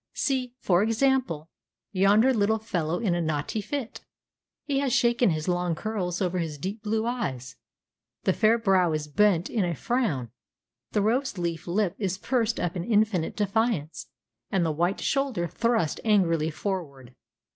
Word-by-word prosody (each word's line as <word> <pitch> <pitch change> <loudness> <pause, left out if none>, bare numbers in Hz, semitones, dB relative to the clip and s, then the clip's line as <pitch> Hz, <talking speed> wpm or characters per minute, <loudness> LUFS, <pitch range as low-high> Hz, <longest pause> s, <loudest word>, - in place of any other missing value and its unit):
See, 255 -3 -1
for 180 -7 +2
example, 225 - +1 0.4
yonder 205 +6 +4
little 220 -1 +2
fellow 175 -7 -2
in 200 -5 0
a 175 - 0
naughty 155 +6 -2
fit. 260 +2 -5 0.6
He 275 -2 0
has 275 -2 0
shaken 235 -1 +3
his 155 -1 -2
long 175 -1 0
curls 190 -2 -2
over 180 0 -1
his 160 -3 -3
deep 195 +8 -5
blue 220 +1 -1
eyes; 130 - -3 0.7
the 190 - +2
fair 220 +3 +3
brow 190 -7 +3
is 155 -1 -2
bent 180 +3 +3
in 220 -5 0
a 175 -2 -1
frown, 165 - -1 0.6
the 210 - +1
rose 245 +1 0
leaf 170 -1 -3
lip 185 0 +1
is 190 -3 -1
pursed 230 +1 0
up 175 0 -2
in 175 - -2
infinite 210 -5 +1
defiance, 205 -6 -1 0.4
and 190 -4 +1
the 160 - +1
white 175 +5 0
shoulder 270 -10 0
thrust 230 -4 0
angrily 165 -8 +2
forward. 150 -8 -5
195 Hz, 155 wpm, -26 LUFS, 170-225 Hz, 0.7 s, yonder